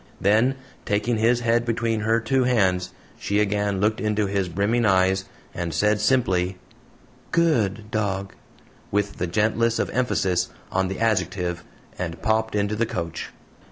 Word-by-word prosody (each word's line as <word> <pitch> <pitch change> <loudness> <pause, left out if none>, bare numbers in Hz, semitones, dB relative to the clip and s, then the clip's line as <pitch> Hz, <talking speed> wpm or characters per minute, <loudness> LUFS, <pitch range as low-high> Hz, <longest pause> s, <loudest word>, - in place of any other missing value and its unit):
Then, 110 +7 +3 0.3
taking 105 +3 0
his 120 +2 +2
head 120 0 +2
between 115 -1 -1
her 110 +2 +2
two 130 +3 +1
hands, 95 -7 +1 0.3
she 100 +1 0
again 105 -1 0
looked 105 +2 +1
into 105 -1 +1
his 100 -2 -1
brimming 100 +7 +1
eyes, 95 -2 +3 0.3
and 85 -3 -3
said, 105 +4 +2
simply, 95 -6 +1 0.7
"GOOD 110 - +1
dog," 100 -3 -2 0.6
with 100 0 -1
the 90 - -1
gentlest 110 +5 +1
of - - -1
emphasis 95 -8 0 0.2
on 95 0 +1
the 95 0 -5
adjective, 95 -5 0 0.4
and 85 -2 -4
popped 110 0 0
into 105 +1 0
the 115 +1 0
coach. 85 -5 -4
105 Hz, 145 wpm, -24 LUFS, 95-115 Hz, 0.7 s, Then